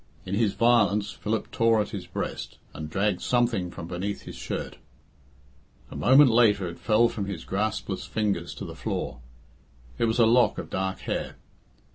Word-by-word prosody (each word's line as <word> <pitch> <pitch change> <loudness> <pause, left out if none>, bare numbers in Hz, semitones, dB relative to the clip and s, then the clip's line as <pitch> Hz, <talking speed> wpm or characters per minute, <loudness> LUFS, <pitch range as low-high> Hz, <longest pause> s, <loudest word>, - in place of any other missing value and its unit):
In 95 - -5
his 105 -1 +2
violence 105 -4 +3
Philip 110 +1 -3
tore 115 -1 +3
at 105 - -1
his 95 -4 -6
breast, 90 - -5 0.2
and 75 0 -6
dragged 100 +2 0
something 120 -7 +1
from 90 -1 -8
beneath 95 +4 -4
his - - -9
shirt. - - -5 1.1
A - - -8
moment 135 0 +6
later 105 -5 +4
it 85 - -8
fell 115 +1 +4
from 105 -3 -4
his 95 -5 -6
graspless 105 -1 -2
fingers 100 -6 -1
to - - -6
the - - -7
floor. 70 - -4 0.8
It - - +3
was 115 +1 0
a 115 - +6
lock 120 +2 +4
of - - -6
dark 95 0 -2
hair. - - -3
105 Hz, 170 wpm, -26 LUFS, 95-115 Hz, 1.1 s, moment